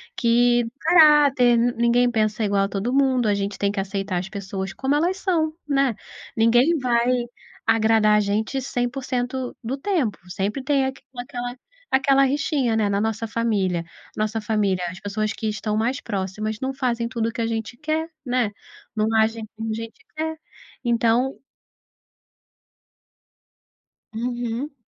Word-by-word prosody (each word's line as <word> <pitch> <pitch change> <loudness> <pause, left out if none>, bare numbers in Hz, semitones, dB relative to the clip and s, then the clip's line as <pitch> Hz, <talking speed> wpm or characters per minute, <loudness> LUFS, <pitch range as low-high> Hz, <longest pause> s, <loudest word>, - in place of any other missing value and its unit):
que 240 0 +3
caráter. 290 -7 +6
Ninguém 240 +1 +3
pensa 215 -1 0
igual 200 -1 +2
a - - -4
todo 205 +6 -2
mundo, 260 -4 +3
a 205 - +3
gente 200 0 -2
tem 200 0 +1
que 200 - -3
aceitar 195 -1 -2
as 185 +2 -6
pessoas 195 -1 -5
como 270 +2 0
elas 350 +5 +1
são, 325 -5 0
né. 275 -5 +2 0.4
Ninguém 240 +9 +4
vai 240 -1 +2 0.6
agradar 220 -1 +4
a - - +4
gente 215 +6 -1
100% 250 0 -2
do 240 +4 -2
tempo, 285 - 0
sempre 200 +8 -2
tem 275 0 +2
aq 265 0 -4 0.2
aquela 245 0 -5 0.3
aquela 270 +1 +4
rixinha, 275 -3 0
né. 215 -2 +1
Na 200 0 +1
nossa 220 +1 -1
família 205 -7 0 0.3
nossa 215 +1 -1
família, 205 -4 0
as 185 +2 -9
pessoas 215 +1 -2
que 220 - -4
estão 210 0 -2
mais 240 +4 0
próximas 210 +1 -3
não 265 0 -2
fazem 240 -3 -1
tudo 230 -2 -1
o - - -6
que 230 - -4
a 225 - 0
gente 225 +1 -4
quer, 315 +3 -2 0.2
né. 245 -4 +1 0.4
Não 215 0 +1
agem 220 0 +1
como 225 0 -4
a - - -1
gente 225 - -7 0.2
quer. 320 +1 -2 0.5
Então 235 +2 +2 2.8
Uhum. 240 +4 -3
235 Hz, 150 wpm, -23 LUFS, 215-260 Hz, 2.8 s, caráter